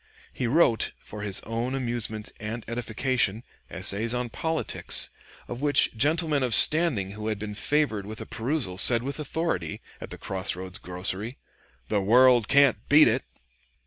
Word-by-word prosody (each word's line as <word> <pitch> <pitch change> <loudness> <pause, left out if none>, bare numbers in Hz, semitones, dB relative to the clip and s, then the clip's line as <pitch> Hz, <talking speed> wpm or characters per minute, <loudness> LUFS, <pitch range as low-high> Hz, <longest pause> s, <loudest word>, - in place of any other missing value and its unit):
He 125 - -3
wrote, 120 -4 +2
for 105 - -10
his 100 -2 -3
own 115 +4 -4
amusement 115 -4 -3
and 110 +2 -6
edification, 115 -1 -1 0.3
essays 115 +4 0
on 125 -1 -3
politics, 160 +6 0 0.4
of 120 +2 -7
which 145 -4 +3
gentlemen 150 +3 +1
of 125 -4 +3
standing 150 - +4
who 105 +1 -7
had 110 -1 -2
been 105 0 -6
favored 110 -4 0
with 110 +1 -8
a - - -7
perusal 115 -7 -3
said 120 +2 +5
with 140 +3 -5
authority, 150 - -3 0.2
at - - -8
the - - -9
cross 95 -1 -3
roads 90 0 -7
grocery, 95 +7 -5 0.5
"The 105 -2 0
world 120 +2 +4
can't 140 -4 +4
beat 150 +2 +7
it." 120 +4 0
115 Hz, 155 wpm, -25 LUFS, 105-135 Hz, 0.5 s, beat